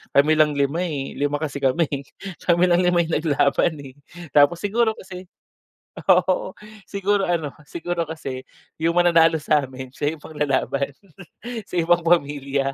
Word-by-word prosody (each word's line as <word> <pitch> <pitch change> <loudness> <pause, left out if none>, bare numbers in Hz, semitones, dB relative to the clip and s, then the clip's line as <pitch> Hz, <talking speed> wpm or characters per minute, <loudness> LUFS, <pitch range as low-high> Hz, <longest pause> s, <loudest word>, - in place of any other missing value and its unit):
kami 155 +3 +4
lang 150 -1 +4
5, 140 +3 0
eh, 140 -4 -4
5 145 +1 0
kasi 145 -2 -4
kami 135 +5 +2
eh, 140 -1 -4 0.4
kami 175 0 +4
lang 175 - +4
5 180 -1 +3
'yung 165 0 -2
naglaban 150 0 +1
eh, 130 -1 -12 0.4
tapos 150 +4 +5
siguro 220 +2 +1
kasi, 185 -1 -10 0.8
oo, 185 0 +2 0.3
siguro 200 -1 0
ano 160 -5 -1 0.2
siguro 170 -1 -3
kasi 135 -5 -6 0.4
'yung 165 +1 +1
mananalo 165 -2 +5
sa'min 130 -4 -2
siya 150 +4 -2
'yung - - -24
ipang - - -11
lalaban 140 -1 0 0.8
sa - - -7
ibang 175 +1 +3
pamilya. 140 -4 0
160 Hz, 150 wpm, -22 LUFS, 140-175 Hz, 0.8 s, tapos